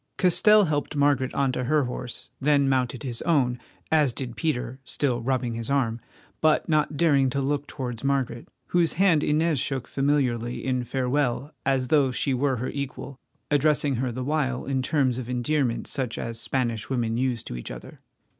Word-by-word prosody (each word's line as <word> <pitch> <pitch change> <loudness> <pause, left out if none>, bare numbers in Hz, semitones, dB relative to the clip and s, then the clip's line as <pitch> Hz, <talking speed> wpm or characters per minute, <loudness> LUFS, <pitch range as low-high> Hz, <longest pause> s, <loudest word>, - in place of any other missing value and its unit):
Castell 210 +3 +5
helped 150 -1 -2
Margaret 140 -3 +2
on 140 -1 +2
to 125 0 -2
her 150 +2 +2
horse, 125 -1 -6
then 140 0 +3
mounted 130 -2 0
his 120 -4 -3
own, 130 -7 +1 0.3
as 150 -5 +3
did 120 -2 -5
Peter, 130 -5 -2
still 125 -2 -1
rubbing 125 -1 -1
his 115 +2 -2
arm, 120 -5 0 0.4
but 155 -1 +3
not 155 -2 +1
daring 140 -5 +3
to 140 - -2
look 145 +1 -1
towards 125 -4 -5
Margaret, 135 -4 -1 0.2
whose 170 -2 +2
hand 170 -4 +3
Inez 155 -1 +2
shook 130 0 -2
familiarly 125 -4 0
in 125 -2 0
farewell 135 +2 -1
as 130 -2 +1
though 140 -4 +4
she 135 +2 -1
were 135 +1 +1
her 125 +2 -3
equal, 140 -1 -6 0.3
addressing 145 -2 +2
her 125 0 -1
the 130 +2 -4
while 135 -3 -1
in 135 -1 0
terms 130 -3 +1
of 125 -1 -6
endearment 125 0 0
such 130 -5 -3
as 115 0 -4
Spanish 120 -5 -2
women 120 -4 0
use 125 -1 -1
to - - -7
each - - -7
other. - - -10
135 Hz, 175 wpm, -25 LUFS, 125-145 Hz, 0.4 s, Castell